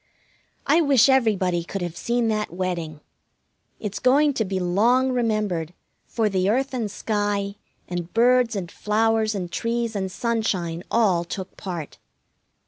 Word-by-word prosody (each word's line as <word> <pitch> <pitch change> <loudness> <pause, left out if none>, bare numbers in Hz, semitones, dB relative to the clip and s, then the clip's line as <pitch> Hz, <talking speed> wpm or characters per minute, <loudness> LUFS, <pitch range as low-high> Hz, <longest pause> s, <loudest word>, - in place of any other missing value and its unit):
I 310 +4 +4
wish 275 -5 +5
everybody 195 -9 +2
could 190 +2 -5
have 175 -1 -4
seen 235 +4 0
that 215 -1 -1
wedding. 170 -4 -4 0.8
It's 210 -2 -4
going 285 +3 +4
to 230 - 0
be 190 -2 -2
long 230 +9 +2
remembered, 210 -9 -1 0.3
for 225 -2 0
the 190 -1 +1
earth 265 +5 0
and 230 -5 -2
sky, 205 -1 -1 0.3
and 175 -1 -5
birds 245 0 +3
and 180 -4 -4
flowers, 220 0 +1
and 180 -3 -4
trees 230 +2 -2
and 190 -2 -2
sunshine 190 -8 -1
all 195 -7 +2
took 185 +2 -7
part. 175 -6 -6
210 Hz, 140 wpm, -23 LUFS, 180-235 Hz, 0.8 s, wish